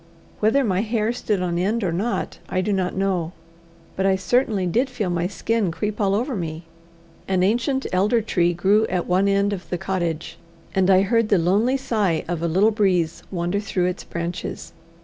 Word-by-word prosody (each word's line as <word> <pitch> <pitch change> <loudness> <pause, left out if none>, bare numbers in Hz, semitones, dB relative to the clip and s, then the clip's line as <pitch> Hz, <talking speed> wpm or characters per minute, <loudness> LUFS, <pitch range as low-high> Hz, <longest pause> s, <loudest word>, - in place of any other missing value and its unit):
Whether 225 +6 +3
my 190 -6 +1
hair 225 0 0
stood 210 -6 -1
on 170 -1 -1
end 210 +5 0
or 180 - 0
not 205 +8 -2
I 185 - 0
do 205 +2 0
not 185 -2 -1
know, 185 -3 -1 0.6
but 190 - -1
I 195 0 +3
certainly 210 -1 +1
did 240 +10 +1
feel 215 -8 -2
my 175 0 0
skin 215 +1 -1
creep 210 +6 -3
all 200 -1 +2
over 250 +4 -1
me. 165 -3 -4 0.6
An 185 -1 +1
ancient 240 +7 +1
elder 205 +6 +3
tree 175 -5 +1
grew 205 +5 +3
at 180 -2 -1
one 185 +2 +2
end 200 +1 +2
of 185 -2 -7
the 180 - -1
cottage, 175 -4 -3 0.3
and 190 -1 +2
I 190 0 +6
heard 230 +1 +1
the 200 - +4
lonely 205 +10 +2
sigh 210 -11 0
of 170 -1 -3
a 170 - 0
little 190 +7 +3
breeze 185 -6 +1
wander 175 +2 -1
through 195 -3 -1
its 180 +1 -2
branches. 170 +1 -5
195 Hz, 190 wpm, -22 LUFS, 180-215 Hz, 0.6 s, I